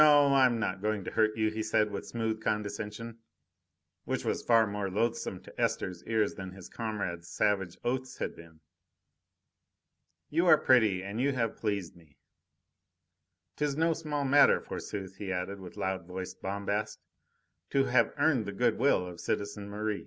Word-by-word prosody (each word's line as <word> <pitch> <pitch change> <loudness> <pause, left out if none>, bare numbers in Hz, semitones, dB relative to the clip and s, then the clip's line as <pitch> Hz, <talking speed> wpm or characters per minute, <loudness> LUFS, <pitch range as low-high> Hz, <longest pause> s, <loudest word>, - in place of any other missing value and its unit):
I 145 -3 +7
am 120 -2 -1
not 95 -4 -2
going 105 -1 -1
to - - -5
hurt 110 -1 +2
you," 110 -1 +2
he 110 0 -3
said 110 -1 +1
with 100 - -5
smooth 110 -1 -2
condescension, 105 +2 -3 0.8
which - - -2
was - - 0
far 115 -2 +5
more 100 -1 -3
loathsome 110 -2 -1
to - - -8
Esther's 90 -2 -1
ears 110 -2 +1
than 95 -1 -7
his 95 -2 -11
comrades' 100 -7 -4
savage 95 -2 0
oaths 130 +1 -2
had - - -3
been. 80 -2 -15 1.7
"You 170 +4 +2
are 155 - +8
pretty 110 -10 +4
and 100 +4 -3
you 140 +1 +2
have 115 -4 -1
pleased 100 -5 -2
me. 80 -5 -21 1.4
'Tis 145 -1 0
no 165 +1 +3
small 150 -3 -2
matter, 140 +2 +6
forsooth!" 95 -2 -6
he 100 -2 -4
added, 95 +2 -3
with 90 -2 -10
loud 95 -2 -2
voiced 95 0 -6
bombast, 100 +2 -2 0.7
"to 135 - +3
have 125 -3 +3
earned 140 -6 +2
the 100 - -4
good 120 +2 +1
will 125 -8 +3
of 90 -1 -9
citizen 100 0 -3
Merri. 105 0 -2
105 Hz, 165 wpm, -30 LUFS, 95-120 Hz, 1.7 s, are